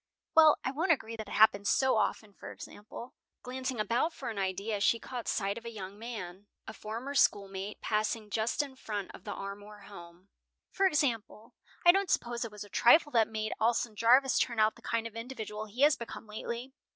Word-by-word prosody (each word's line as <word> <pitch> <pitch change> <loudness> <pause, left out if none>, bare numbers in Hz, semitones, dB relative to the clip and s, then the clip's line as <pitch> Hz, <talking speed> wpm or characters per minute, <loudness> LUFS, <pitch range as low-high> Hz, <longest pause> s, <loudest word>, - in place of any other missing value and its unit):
Well, 315 -2 +7
I - - -1
won't 330 +6 +1
agree 230 -7 0
that 220 -1 -7
it - - -8
happens 205 -2 +4
so 265 -2 +3
often. 215 -1 -1
For - - -10
example," 220 +4 -10 0.3
glancing 255 -1 -4
about 235 +10 +1
for - - -5
an 210 - -5
idea, 200 +2 -2
she 230 - +4
caught 245 -1 -7
sight 200 +2 -1
of - - -23
a 235 - -6
young 200 -2 -8
man, 205 -5 -7 0.2
a 220 - -8
former 230 +7 -6
schoolmate, 200 -5 +1
passing 215 0 -1
just 225 +7 0
in 275 -2 -10
front 210 -6 -5
of - - -13
the - - -4
Armour 205 +1 -8
home, 180 -1 -13 0.4
"for 390 0 +3
example, 235 - -1 0.3
I 345 - +10
don't 390 +1 0
suppose 240 0 0
it 230 - -6
was 210 -1 -8
a - - -12
trifle 295 - +5
that 225 -4 +4
made 215 -1 -3
Alson 230 0 +1
Jarvis 250 +5 +4
turn 235 -2 0
out 215 0 +4
the - - -17
kind 230 0 -2
of 230 -1 -7
individual 220 -3 -6
he 230 +6 -6
has 295 0 +6
become 235 -1 -8
lately. 235 +4 -6
225 Hz, 200 wpm, -31 LUFS, 210-250 Hz, 0.4 s, I